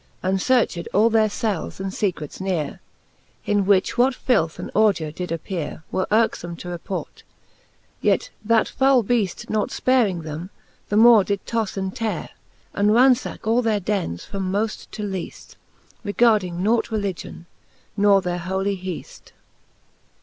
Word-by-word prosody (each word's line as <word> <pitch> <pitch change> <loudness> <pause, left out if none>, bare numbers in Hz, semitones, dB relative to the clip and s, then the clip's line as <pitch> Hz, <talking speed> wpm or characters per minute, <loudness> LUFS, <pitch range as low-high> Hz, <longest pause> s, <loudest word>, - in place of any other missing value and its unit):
And 190 0 0
fearched 240 -9 +1
all 220 +3 +4
their 220 -1 +3 0.2
eels 195 -6 -2
and 190 0 -3
fecrets 180 -7 -3
neare; 180 -6 -2 0.7
In 205 -2 +1
which 200 +3 +2
what 255 +1 +4
filth 165 -14 +1
and - - -7
ordure 200 -8 +2
did 180 +3 -5
appeare, 165 -2 -4
Were 185 - -1
yrkefome 205 -6 +1
to 175 - -8
report; 175 +2 -6 0.8
yet - - +1
that 225 +1 +3
foule 265 -2 +3
Beaft 210 -4 -1
Nought 215 -1 0
fparing 220 -10 +1
them, 160 +4 -6 0.4
the 205 - +1
more 225 -2 +7
did 200 0 -3
toffe 225 -4 -2
and 190 -1 -3
teare. 225 -2 -3 0.4
And 205 +1 +2
ranfacke 245 +1 +3
all 230 +3 +3
their 220 -3 +1
dennes 185 - -2
from 190 -2 -4
moft 215 +3 -2
to 210 - -6
leaft, 190 -4 -6 0.5
Regarding 205 -5 +2
nought 225 +3 +2
religion, 200 -5 -4 0.5
nor 200 -2 +4
their 180 0 -2
holy 190 +3 -2
heaft. 185 -2 -8
200 Hz, 145 wpm, -22 LUFS, 180-220 Hz, 0.8 s, more